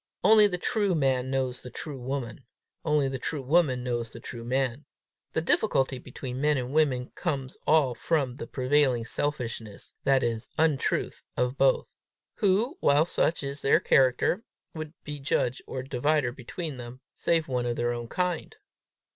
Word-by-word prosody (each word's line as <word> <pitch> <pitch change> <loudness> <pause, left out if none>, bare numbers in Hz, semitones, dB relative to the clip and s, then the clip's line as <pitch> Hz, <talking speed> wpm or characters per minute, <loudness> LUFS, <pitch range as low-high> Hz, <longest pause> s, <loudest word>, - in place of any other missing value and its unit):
Only 210 +2 +8
the 180 -3 -2
true 205 -1 +1
man 130 -3 +1
knows 130 -2 -1
the 125 - -8
true 140 +1 -6
woman; 130 -1 -4 0.4
only 150 -3 +2
the 135 -1 -3
true 145 +1 -3
woman 135 -3 +2
knows 120 -2 -2
the 115 - -10
true 115 0 -8
man: 130 +2 -1 0.5
the 160 - +1
difficulty 135 -8 +2
between 130 0 -6
men 150 -1 +3
and 125 +1 -3
women 135 -5 +2
comes 135 -7 -3
all 150 -5 +4
from 135 -1 -1
the - - -6
prevailing 130 -3 +2
selfishness, 115 -7 -4
that 135 -1 +3
is, 115 0 -2
untruth, 155 -4 +1 0.2
of 125 +1 +1
both. 135 -1 +2 0.4
Who, 210 - +2
while 145 +2 +4
such 165 -2 0
is 140 +1 -4
their 140 - +4
character, 130 - +3 0.3
would 155 -1 -6
be 150 -1 -6
judge 130 -2 0
or 130 -1 -4
divider 135 0 +1
between 135 +4 -6
them, 120 +1 -9
save 165 -2 +1
one 125 -2 -1
of 120 - -1
their 120 0 0
own 120 -1 -5
kind? 180 - -2
135 Hz, 165 wpm, -28 LUFS, 125-155 Hz, 0.5 s, Only